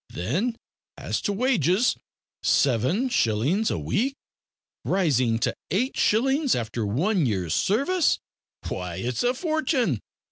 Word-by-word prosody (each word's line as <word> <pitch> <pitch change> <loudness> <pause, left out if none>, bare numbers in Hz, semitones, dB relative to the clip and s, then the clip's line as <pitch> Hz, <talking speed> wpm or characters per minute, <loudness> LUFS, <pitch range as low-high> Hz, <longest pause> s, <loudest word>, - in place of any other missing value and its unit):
Then, 185 - -2 0.4
as - - -3
to 205 - -1
wages, 205 - +2 0.5
seven 140 - +2
shillings 155 - +1
a - - -1
week, 270 +6 -1 0.7
rising 130 -11 +2
to 115 - -1
eight 250 +9 0
shillings 270 +6 +2
after 115 -2 -3
one 165 - +1
year's 95 -7 -1
service. 290 - +2 0.5
Why, 90 -2 -4
it's 120 +4 -2
a 245 +1 +1
fortune! 270 - 0
190 Hz, 115 wpm, -25 LUFS, -, 0.7 s, wages